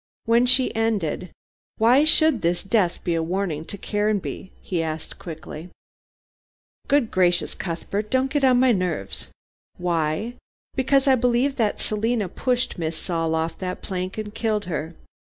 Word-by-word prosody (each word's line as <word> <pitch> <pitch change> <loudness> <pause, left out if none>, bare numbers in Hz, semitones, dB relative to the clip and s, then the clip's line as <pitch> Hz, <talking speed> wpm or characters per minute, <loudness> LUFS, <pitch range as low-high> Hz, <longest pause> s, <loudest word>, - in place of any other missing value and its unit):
When 235 +2 +4
she 255 +1 +4
ended, 205 -6 -1 0.5
"Why 245 +7 +5
should 315 -6 +4
this 175 +1 0
death 195 -4 +1
be 175 - 0
a 165 - +1
warning 170 -2 -2
to 200 - -7
Caranby?" 205 -2 -2
he 175 -3 -2
asked 160 -1 -5
quickly. 160 0 -8 1.2
"Good 275 -5 +2
gracious, 180 -1 +2
Cuthbert, 195 +4 -4
don't 260 +2 +1
get 290 -1 0
on 255 -2 +5
my 255 0 +5
nerves. 180 - -2 0.5
Why? 175 +5 -1 0.4
because 270 +1 +2
I 270 - +7
believe 250 +2 +2
that 220 -4 +1
Selina 215 0 0
pushed 250 -1 -1
Miss 160 -1 -2
Saul 165 -2 -1
off 160 0 -2
that 185 -1 -4
plank 185 0 -4
and 210 -1 -5
killed 215 -3 -1
her. 160 -1 -4
200 Hz, 150 wpm, -24 LUFS, 170-240 Hz, 1.2 s, I